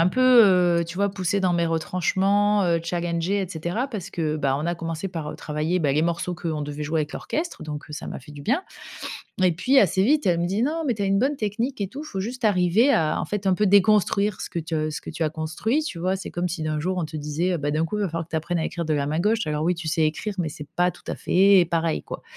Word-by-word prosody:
un 165 - +5
peu, 255 - -1 0.6
heu, - - 0
tu 165 - -8
vois 200 +2 +1
poussée 195 0 -1
dans 185 -2 +2
mes 170 -1 +1
retranchements, 190 +5 +1
heu, 170 -2 +2
challengée 170 +3 -1
et 185 - -5
cetera 175 - -3
parce 205 -8 -6
que 155 -5 -2
bah 140 -3 +1
on 150 - -3
a 175 - 0
commencé 165 +2 -4
par, 165 -5 -5
heu, - - -9
travailler 155 +4 -1
bah 145 - +2
les 150 - +2
morceaux 170 +2 -1
qu'on 160 -3 -3
devait 145 +1 -5
jouer 155 +2 0
avec 150 0 -4
l'orchestre 335 +2 -4
donc 150 -1 -6
ça 150 - -6
m'a - - -6
fait 140 - -14
du 145 - -10
bien. 265 - 0 0.8
Et 180 - +5
puis 250 +12 +2
assez 190 -2 +3
vite, 295 +7 +3
elle 175 -2 +3
me 170 - 0
dit: 200 +5 0
«Non, 320 +4 -1
mais 250 -5 +1
tu 205 - -5
as - - +1
une 195 0 +2
bonne 275 +5 +1
technique 230 +3 -2
et 200 - -1
tout, 280 +9 -8
faut 195 -11 -5
juste 240 +5 -5
arriver 205 +5 +4
à 160 - +1
en - - -3
fait 205 +4 -4
un 190 - +4
peu 210 +3 +2
déconstruire 200 0 +3
ce - - -5
que 170 - -3
tu 165 +1 -6
as 155 0 0
ce 150 - -4
que - - -8
tu - - -9
as 155 - +1
construit». 160 - -1
Tu 175 - -5
vois? 185 +2 0
C'est 190 - -7
comme 175 +1 -1
si 165 -1 -4
d'un 155 -1 -1
jour 185 +4 -1
on 170 - -1
te 155 0 -7
disait: 150 +5 -1
«Heu, - - 0
bah, 145 -1 -2
d'un 155 +2 +1
coup, 190 +6 -3
il - - -1
va 200 - +1
falloir 165 -1 -4
que 165 - -31
tu - - -2
apprennes 165 +2 -1
à 160 - -1
écrire 170 +1 -3
de 155 - 0
la 140 -1 0
main 155 +3 -1
gauche». 215 +5 +2
Alors 150 0 -1
oui, 175 +2 +2
tu 165 -1 -6
sais 160 +1 +1
écrire, 205 +7 -2
mais 160 -3 0
c'est 150 -1 -9
pas 180 0 +3
tout 175 - -18
à - - -2
fait 190 0 +4
pareil 165 -1 0
quoi. - - -8
175 Hz, 290 wpm, -24 LUFS, 160-200 Hz, 0.8 s, un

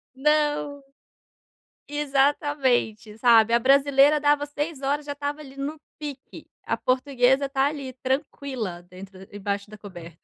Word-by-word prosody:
Não, 295 0 0 1.1
exatamente, 275 -6 0
sabe. 230 -1 +5
A - - +6
brasileira 280 +3 +4
dava 290 0 +2
6h 295 +1 -4
já 285 +1 -2
estava 285 +1 -4
ali 275 -2 -12
no 290 +3 -5 0.2
pique, 285 -3 -9 0.2
a - - 0
portuguesa 260 +1 +1
tá 270 -1 +1
ali 280 -3 -4
tranquila 260 - -3
dentro 185 +1 -13 0.2
embaixo 200 0 -4
da 215 - -11
coberta. 170 -5 -11
275 Hz, 125 wpm, -24 LUFS, 230-290 Hz, 1.1 s, A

